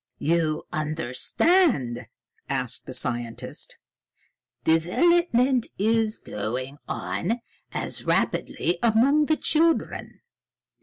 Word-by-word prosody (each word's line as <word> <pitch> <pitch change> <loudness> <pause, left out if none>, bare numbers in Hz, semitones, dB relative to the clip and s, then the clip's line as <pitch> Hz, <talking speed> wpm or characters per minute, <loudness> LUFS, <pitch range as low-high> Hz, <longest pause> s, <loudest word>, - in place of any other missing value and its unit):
"You 160 -1 0
understand?" 150 - +1 0.4
asked - - -2
the - - -6
scientist. 120 -1 -1 0.9
"Development 250 - +3
is 220 +1 +1
going 130 +7 -5
on 225 +8 -2 0.3
as - - -3
rapidly 175 0 0
among 260 +7 +4
the 310 - +2
children. 330 +1 0
190 Hz, 80 wpm, -25 LUFS, -, 0.9 s, among